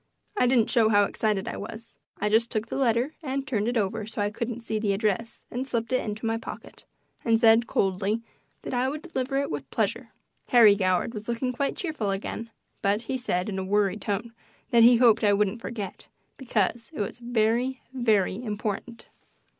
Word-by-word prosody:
I 250 - +3
didn't 240 -3 +3
show 225 -2 +4
how 205 -1 +5
excited 205 -1 -1
I - - -4
was; 225 +1 -9 0.2
I 210 - 0
just 225 +2 +3
took 215 -2 -2
the - - -4
letter 250 +2 +1
and 275 -2 -3
turned 220 -7 -1
it 245 0 0
over 215 +1 -1
so 220 - -6
I 205 0 +1
couldn't 235 +1 -4
see 220 -1 -2
the 205 -2 +1
address 215 +2 -2
and 255 +2 -3
slipped 235 -1 -2
it 255 - +2
into 215 +1 -4
my 225 0 +1
pocket, - - -9 0.4
and 225 -1 +3
said, 225 0 +5
coldly, 195 +4 0 0.4
that - - -5
I 250 +1 +1
would 300 +2 -5
deliver 270 -6 -2
it 280 0 -1
with - - -5
pleasure. - - -1 0.4
Harry 230 -4 +7
Goward 185 +2 +1
was 210 -1 -7
looking 240 +2 -1
quite 275 +3 -1
cheerful 310 - -2
again, 200 +3 -4 0.3
but 205 +3 +1
he 260 - -3
said, 185 -8 -1
in 195 -2 -3
a - - -2
worried 205 +1 +1
tone, 215 +3 -3 0.4
that 235 - +6
he 240 +2 +8
hoped 230 -2 +5
I 205 -1 +5
wouldn't 210 +2 0
forget, 210 -6 -6 0.3
because 230 -2 -1
it - - -6
was 205 +3 -3
very, 240 +2 0
very 220 -3 +1
important. 215 +1 -4
225 Hz, 195 wpm, -26 LUFS, 210-245 Hz, 0.4 s, he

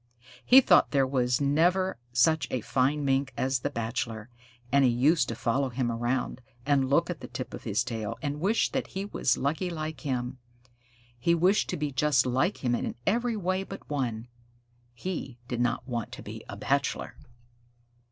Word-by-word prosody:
He 265 +2 +8
thought 180 -8 +5
there 135 -2 +3
was 125 -2 +1
never 170 +5 +2
such 145 +6 +3
a 125 - -2
fine 140 +5 +1
Mink 135 0 +1
as 130 -1 +1
the 145 - -2
Bachelor, 115 -2 -4 0.4
and 140 0 +5
he 130 - +5
used 140 +7 +3
to 115 - -3
follow 130 +4 0
him 125 -1 -1
around, 120 +2 -2 0.2
and 135 -2 +2
look 170 +5 +3
at 170 - -6
the - - -8
tip 130 - -6
on - - -5
his 110 0 0
tail, 110 -4 -4
and 145 0 -3
wish 200 +7 +1
that - - -2
he 195 +1 -4
was 130 - +1
lucky 155 +7 -1
like 155 -2 -5
him. 125 -3 -3 0.8
He 170 +8 +3
wished 185 +5 +3
to - - -2
be 150 -1 -2
just 135 0 +3
like 130 +6 0
him 120 - +2
in - - -2
every 235 +2 +1
way 185 -1 0
but 195 0 -9
one; 120 -5 -2 0.7
he 135 -4 -5
did 120 -1 -2
not 120 +1 0
want 120 -3 -3
to - - -8
be - - -8
a - - -6
bachelor. - - -1
135 Hz, 180 wpm, -28 LUFS, 125-165 Hz, 0.8 s, He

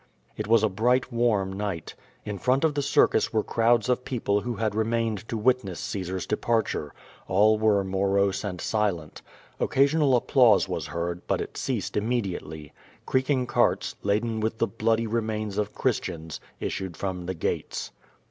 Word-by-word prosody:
It 105 - -4
was 115 0 +4
a - - +5
bright, 125 +6 +1
warm 110 -5 +1
night. 95 -5 -4 0.3
In 105 -2 -4
front 130 - +2
of 160 -2 +3
the 145 - 0
circus 145 0 +3
were 110 -2 +1
crowds 115 -1 +2
of 125 0 +1
people 105 -6 0
who 120 +1 -3
had 110 -1 -1
remained 110 -1 -1
to 115 - -2
witness 110 -5 +1
Caesar's 95 -2 -3
de - - 0
parture. 110 -10 0 0.4
All 105 +3 +4
were 105 -2 +3
morose 95 +1 +1
and 90 -4 -4
silent. 100 -8 -1 0.4
Occasional 140 0 +3
applause 120 -5 +4
was 85 -4 -3
heard, 85 +3 -3
but - - +1
it - - -6
ceased - - -3
immediately. 95 - -3 0.3
Creaking 130 0 +1
carts, - - +1
laden 110 +2 0
with 110 +1 -1
the 115 - +2
bloody 115 0 0
remains 110 -2 -2
of 105 0 -2
Christians, 85 - -2 0.2
issued 95 -3 -4
from 90 -3 -4
the 95 - -2
gates. - - -3
105 Hz, 160 wpm, -26 LUFS, 95-115 Hz, 0.4 s, a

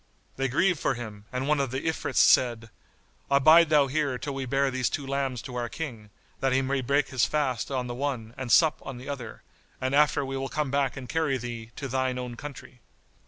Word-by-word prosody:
They 135 0 0
grieved 170 +6 +2
for - - 0
him 105 -3 -8
and 130 +1 -2
one 150 -1 +2
of 135 -2 0
the 130 +2 -3
Ifrits 160 - -2
said, 115 -3 +4 0.6
"Abide 155 +4 +6
thou 150 -2 +5
here 140 -1 -1
till 140 +2 -5
we 135 -1 -4
bear 135 +1 +1
these 130 -1 0
two 145 - -3
lambs 135 -3 -2
to 130 - -8
our 120 -1 -3
King, 115 -10 -6 0.3
that 135 0 +1
he 135 +1 +2
may 135 0 0
break 140 +2 +1
his 130 -3 +2
fast 135 -6 -1
on 130 -2 -2
the 120 - -4
one 120 -4 -3
and 130 -3 -5
sup 155 +8 +5
on 135 - -7
the 130 +2 -10
other, 130 -6 -6 0.4
and 130 +1 -1
after 145 -1 +3
we 135 0 -4
will 135 0 -3
come 150 -2 -2
back 140 -2 0
and 130 -2 -7
carry 155 -3 0
thee 120 -2 -6
to 140 - -5
thine 130 0 -1
own 125 -1 -5
country." 135 -2 -10
135 Hz, 220 wpm, -27 LUFS, 125-140 Hz, 0.6 s, Abide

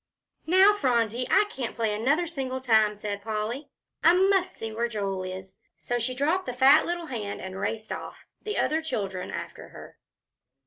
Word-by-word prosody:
"Now, 380 +4 +6
Phronsie, 245 - 0
I 400 - +5
can't 255 - -5
play 225 -2 0
another 275 +11 +1
single 265 -5 -4
time," 220 -4 +3
said 205 -1 -5
Polly. 220 +6 -4 0.3
"I 340 - +7
must 375 -1 +2
see 225 0 -5
where 230 +2 -1
Joel 200 -4 -3
is." 185 +1 -8 0.2
So 245 0 -2
she 250 +2 -2
dropped 315 +7 0
the 250 - -2
fat 275 +4 +6
little 345 -1 -3
hand 220 -8 -5
and 190 0 -7
raced 220 +2 -3
off, - - -7 0.2
the 425 0 -4
other 315 +1 +1
children 195 - -4
after - - -7
her. - - -13
240 Hz, 175 wpm, -27 LUFS, 210-315 Hz, 0.3 s, I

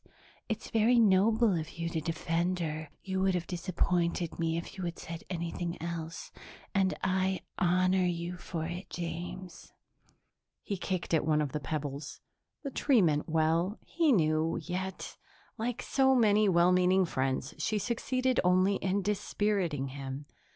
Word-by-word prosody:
It's 220 - -4
very 230 +2 +4
noble 220 +1 +4
of 160 +1 -5
you 170 0 -2
to 165 -1 -2
defend 170 +3 -1
her; 155 -2 -3
you 190 -1 -2
would 190 -1 +2
have 175 -1 -1
disappointed 175 -1 -1
me 165 0 0
if 170 - -6
you 190 - -5
had 170 -1 -3
said 165 0 -7
anything 170 -1 -3
else, 165 0 -5 0.4
and 190 -1 +2
I 190 0 +1 0.2
honor 185 +1 +3
you 175 0 -3
for 170 -2 -4
it, 175 +3 -6
James." 175 +1 -6 0.9
He 200 - -2
kicked 185 -2 -3
at 160 - +3
one 155 0 +2
of 145 -3 -1
the 150 - -2
pebbles. 145 -1 -4 0.4
The 275 - -4
tree 255 -5 +3
meant 150 -1 +1
well, 165 +5 +1
he 330 -3 +2
knew, 160 -5 +2
yet, 185 +1 -5 0.4
like 235 +1 -2
so 265 -1 +3
many 215 -3 +4
well 175 0 +5
meaning 185 +1 +4
friends, 130 -3 -1
she 215 +7 0
succeeded 255 +4 0
only 185 +2 +3
in 195 +1 0
dispiriting 195 -8 0
him. 135 +1 -6
180 Hz, 150 wpm, -31 LUFS, 165-195 Hz, 0.9 s, well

